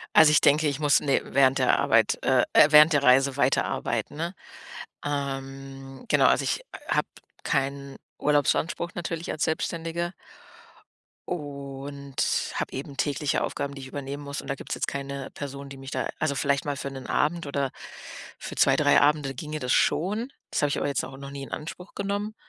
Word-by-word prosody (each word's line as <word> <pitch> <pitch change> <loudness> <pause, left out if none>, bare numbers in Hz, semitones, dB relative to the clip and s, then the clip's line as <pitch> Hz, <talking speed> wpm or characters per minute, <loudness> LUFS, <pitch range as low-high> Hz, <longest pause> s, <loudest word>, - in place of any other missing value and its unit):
Also, 155 -1 +8
ich 150 - +6
denke, 150 +2 +4
ich 140 +1 -4
muss 145 -1 +4
ne, 140 -2 +2
während 135 0 +3
der 130 - +3
Arbeit 115 -6 +3
äh, 130 -2 +4
äh, 150 - +8
während 150 +1 +8
der 145 -1 +3
Reise 135 +1 +5
weiterarbeiten, 130 -2 0
ne? 170 +4 -3 0.7
Ähm. 135 - -5
Genau, - - +4
also, - - +4
ich - - -2 0.2
habe - - +1 0.4
keinen 140 0 -1 0.2
Urlaubsanspruch 150 +3 +1
natürlich 170 -1 -4
als 155 - -1
Selbstständige. 165 +2 -2 1.2
Und 140 -3 -6 0.4
habe - - -3
eben 135 +1 -7
tägliche 145 0 0
Aufgaben, 140 0 -3
die 135 - -9
ich 130 - -8
übernehmen 140 +1 -6
muss, 140 0 -5
und - - -12
da 135 - -1
gibt's 135 - -5
jetzt - - -2
keine 140 -1 -5
Person, 140 -1 -7
die 135 - -9
mich 135 0 -9
da - - -2
also, 150 -3 0
vielleicht 140 +1 0
mal 145 -2 -2
für 140 - -5
'nen 135 -1 -8
Abend 160 +1 0
oder 140 -2 -1 0.7
für - - -7
2, - - +4
3 - - +4
Abende, 145 -2 +2
ginge 155 +4 -5
das 125 -1 0
schon. 215 - +1 0.2
Das - - 0
habe 145 - +2
ich - - -1
aber - - -1
jetzt 140 - -1
auch 135 0 -8
noch 140 0 -8
nie 140 - -7
in - - -10
Anspruch 180 +4 -7
genommen. 205 +2 -3
140 Hz, 185 wpm, -26 LUFS, 135-150 Hz, 1.2 s, Also